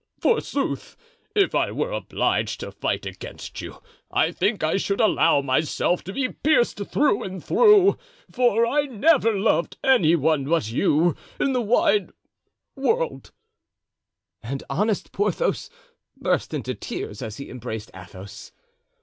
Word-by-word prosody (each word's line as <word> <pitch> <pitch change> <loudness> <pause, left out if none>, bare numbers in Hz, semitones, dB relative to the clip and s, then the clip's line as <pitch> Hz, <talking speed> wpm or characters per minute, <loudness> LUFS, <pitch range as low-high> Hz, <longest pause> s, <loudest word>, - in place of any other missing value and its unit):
Forsooth! 465 - -1 0.4
If 400 -2 +3
I - - +1
were - - -2
obliged - - -1
to - - -6
fight - - -3
against - - -8
you, - - -10 0.3
I - - +1
think 205 -5 -1
I 155 +4 +1
should 200 0 -1
allow 215 -9 +3
myself 145 +6 0
to 190 - -5
be 265 +1 0
pierced 270 -4 +1
through 290 -9 +2
and 185 -2 -7
through, 420 -4 +5 0.3
for 240 -2 +3
I 290 +5 +1
never 260 0 +3
loved 195 -4 0
any 185 -12 +4
one 155 -2 +1
but 150 -8 0
you 155 +6 +2 0.2
in 275 - +1
the 250 - +1
wide 310 - +2 0.7
world;" 450 - -1 1.1
and 135 +4 -5
honest 205 +7 -1
Porthos 205 -2 -1 0.5
burst - - -1
into - - -3
tears 105 - -6
as 110 -4 -6
he 140 - -8
embraced 115 -3 -6
Athos. 95 +2 -11
200 Hz, 135 wpm, -23 LUFS, -, 1.1 s, through